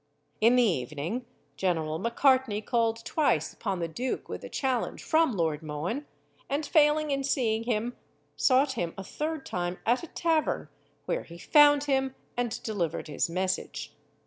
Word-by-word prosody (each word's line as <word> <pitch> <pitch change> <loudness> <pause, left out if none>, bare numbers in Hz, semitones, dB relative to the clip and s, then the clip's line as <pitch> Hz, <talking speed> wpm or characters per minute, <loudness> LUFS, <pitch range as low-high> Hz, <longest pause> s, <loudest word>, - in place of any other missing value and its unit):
In 230 +3 +5
the 250 - +5
evening, 170 - -2 0.3
General 160 -4 0
Macartney 245 -1 +2
called 230 0 0
twice 310 -2 +1
upon 195 -4 -3
the 170 -1 -2
duke 245 +11 -3
with - - -6
a - - -7
challenge 260 -4 -1
from 320 -5 +3
Lord 160 -5 0
Mohun, 160 - -4 0.4
and 290 +2 -1
failing 300 -1 +3
in 275 0 0
seeing 230 -5 0
him, 235 +1 -1 0.4
sought 265 +1 +4
him 175 -10 -3
a 195 - -5
third 305 +7 -4
time 175 0 -2
at 240 +3 +3
a 335 - -7
tavern, 320 -1 0 0.4
where - - -1
he 170 - -12
found 290 - +6
him, 270 -2 0 0.2
and 240 -2 -2
delivered 180 -9 -2
his 150 - 0
message. 185 +2 -2
235 Hz, 155 wpm, -28 LUFS, 180-275 Hz, 0.4 s, found